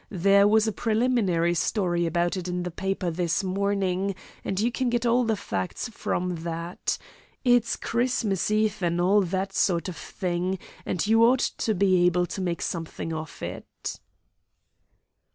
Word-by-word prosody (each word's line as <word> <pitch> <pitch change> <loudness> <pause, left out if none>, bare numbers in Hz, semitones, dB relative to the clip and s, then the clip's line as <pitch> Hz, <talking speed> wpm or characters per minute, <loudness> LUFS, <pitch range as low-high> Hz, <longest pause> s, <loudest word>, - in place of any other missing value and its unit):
There 200 +1 +4
was 220 +1 +4
a - - +1
preliminary 215 -7 +1
story 175 -1 0
about 175 +2 0
it 185 -1 -4
in 180 0 -2
the 180 - -4
paper 190 0 -2
this 175 +3 0
morning, 195 0 0 0.3
and 190 - -2
you 235 +3 +2
can 255 0 0
get 240 0 0
all 240 +1 +3
the 225 -1 +1
facts 95 - -3
from 180 -5 -2
that. 170 +1 -3 0.5
It's 245 -3 +3
Christmas 235 -6 0
Eve, 215 -1 +1
and 170 -1 0
all 195 +4 +4
that 190 +1 -2
sort 175 -3 +1
of 180 - -6
thing, 180 +2 -2 0.3
and 180 - 0
you 225 +2 +5
ought 245 +2 +4
to 220 - +1
be 185 -2 +3
able 180 0 +2
to 190 - -5
make 175 -2 -2
something 165 -1 -4
of 160 -1 -6
it." - - -6
190 Hz, 160 wpm, -26 LUFS, 175-215 Hz, 0.5 s, you